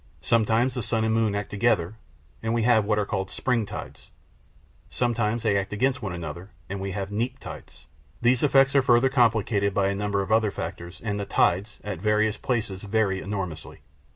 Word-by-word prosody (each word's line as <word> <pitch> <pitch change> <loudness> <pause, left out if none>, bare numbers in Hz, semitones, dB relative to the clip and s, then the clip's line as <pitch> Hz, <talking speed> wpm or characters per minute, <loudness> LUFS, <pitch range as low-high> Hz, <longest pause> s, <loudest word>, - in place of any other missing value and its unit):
Sometimes 115 +2 +2
the 125 - -3
sun 115 -1 0
and 110 0 +1
moon 110 -2 +1
act 100 -1 -4
together, 105 -4 +1 0.5
and 115 +1 -1
we 115 - +1
have 110 -3 +4
what 105 0 +1
are 105 - +1
called 95 -1 -3
spring 115 -5 0
tides; - - -8 0.8
sometimes 115 -2 0
they 105 -3 +2
act 100 -1 -1
against 130 +5 0
one 100 -4 -3
another, 85 +2 -6 0.2
and 100 +1 -5
we 100 - -3
have 95 +1 -4
neap 120 +5 -2
tides. - - -11 0.3
These 120 +1 +3
effects 135 -1 +4
are 140 - +6
further 125 +1 +4
complicated 110 -5 +2
by 100 -1 +2
a 100 - -1
number 100 0 -1
of 95 - -6
other 110 -1 +4
factors, 85 -1 -7
and 105 -2 -2
the 100 - -3
tides, 100 +4 +1
at 100 -4 -5
various 105 +1 +2
places, 105 -6 -2
vary 100 -2 0
enormously. 95 -5 -5
105 Hz, 190 wpm, -25 LUFS, 100-115 Hz, 0.8 s, are